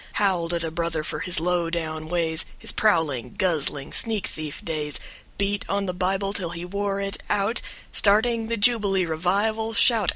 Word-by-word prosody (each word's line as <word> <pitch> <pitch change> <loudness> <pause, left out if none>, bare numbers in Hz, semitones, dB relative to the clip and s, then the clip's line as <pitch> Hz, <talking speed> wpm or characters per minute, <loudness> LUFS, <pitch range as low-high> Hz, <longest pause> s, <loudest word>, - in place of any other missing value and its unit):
Howled 185 -5 +1
at 170 - -2
a 165 - -2
brother 165 -1 -1
for - - -4
his 180 -5 +2
low 175 0 +1
down 155 -2 -3
ways, 165 -1 0
His - - -1
prowling, 155 - +1
guzzling, 150 -6 0
sneak 220 -4 0
thief 155 -2 -5
days. 150 -3 0 0.4
Beat 200 0 0
on 200 0 0
the 180 - -2
Bible 195 +2 0
till 185 -5 -2
he 170 +1 -5
wore 200 +1 -2
it 195 0 -3
out 205 +3 +1 0.3
Starting 225 +2 +3
the 230 0 -1
jubilee 205 -4 +3
revival 200 +7 0
shout. 230 -3 +4
185 Hz, 170 wpm, -25 LUFS, 165-205 Hz, 0.4 s, shout